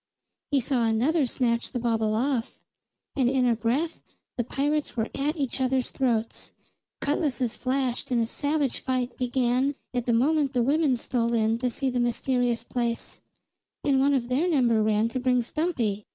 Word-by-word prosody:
He 285 - +3
saw 245 -2 +1
another 260 +7 +2
snatch 235 -1 0
the 255 - -3
bauble 225 -2 +1
off; 245 0 -1 0.6
and 260 -4 +3
in 260 -1 +2
a 240 -2 +3
breath 250 +9 -1 0.3
the 240 - 0
pirates 290 +3 -1
were 225 0 0
at 290 +3 -1
each 270 -2 -2
other's 260 -1 +1
throats; 235 -4 -1 0.5
cutlases 280 -5 0
flashed 255 -1 -1
and 245 -2 +2
a 230 - +2
savage 285 +2 -1
fight 255 -1 -2
began 255 +2 +1 0.2
at 245 -1 -2
the - - +3
moment 285 +4 +2
the 245 -2 +2
women 285 0 +2
stole 235 -1 0
in 225 0 +1
to 250 0 0
see 265 +2 -2
the 250 - -1
mysterious 240 0 0
place, 235 -1 -3 0.6
and 275 -2 +3
one 280 +1 +3
of 240 -3 -1
their 280 +8 +1
number 240 -8 +3
ran 215 +1 +2
to 255 - -3
bring 250 -1 +2
Stumpy. 235 - -2
250 Hz, 170 wpm, -26 LUFS, 235-275 Hz, 0.6 s, He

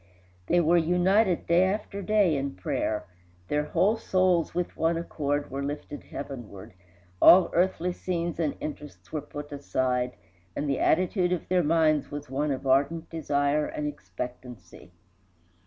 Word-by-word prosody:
They 175 - +3
were 170 +1 +4
united 180 +3 +2
day 170 +2 +4
after 200 +1 -3
day 200 -5 +3
in 140 -3 -3
prayer 105 +3 -2 0.4
their 150 0 0
whole 205 +8 +2
souls, 185 -5 +1
with 180 0 -2
one 165 +1 +1
accord, 145 -3 -2
were 135 +1 -3
lifted 145 +1 -6
heavenward; 120 -11 -8 0.5
all 185 0 +8
earthly 180 0 +1
scenes 170 -2 -3
and 155 -3 0
interests 150 -1 -8
were 155 - -2
put 145 +1 -9
aside, 125 -3 -1 0.4
and 145 - -2
the 140 -2 0
attitude 180 +1 +2
of 180 - -2
their 180 0 +3
minds 155 -2 +2
was 145 -2 -7
one 145 +3 0
of 135 -1 -3
ardent 140 +5 +1
desire 145 -2 0
and 150 - -4
expectancy. 110 -4 -8
150 Hz, 145 wpm, -27 LUFS, 140-175 Hz, 0.5 s, all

